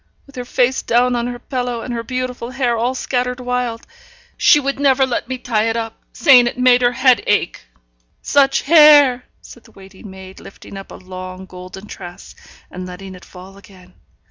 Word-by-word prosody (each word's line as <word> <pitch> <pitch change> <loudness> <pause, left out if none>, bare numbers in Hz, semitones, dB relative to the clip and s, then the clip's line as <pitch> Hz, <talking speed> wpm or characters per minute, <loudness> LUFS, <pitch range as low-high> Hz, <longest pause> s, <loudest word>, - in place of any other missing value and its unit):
with 280 - -18
her 250 -1 -6
face 255 +1 0
down 245 +1 +1
on 240 0 -2
her 245 0 -5
pillow, 245 -1 -4
and 245 - -6
her 230 - -3
beautiful 250 0 -5
hair 255 -2 -1
all 240 +3 -1
scattered 250 -1 -2
wild; 250 -2 -3 0.5
she 340 -4 +4
never 275 -1 +1
would 260 - 0
let 240 - -2
me 260 - -3
tie 225 -3 -1
it 225 - -2
up, 225 -1 -5 0.2
saying 255 -6 +5
it 240 - -4
made 250 0 +4
her 245 0 +2
head 255 -1 +3
ache. 205 -4 -1 0.5
Such 275 -1 +2
hair!' 290 -5 +6 0.2
said 240 - -15
the - - -19
waiting 195 +1 -14
maid, 190 0 -12
lifting 195 - -13
up 195 0 -10
a - - -9
long 185 0 -9
golden 185 +2 -11
tress, 175 -4 -11 0.4
and 185 0 -7
letting 190 +1 -10
it 180 - -14
fall 190 +1 -14
again. 185 -2 -19
240 Hz, 190 wpm, -18 LUFS, 195-255 Hz, 0.5 s, hair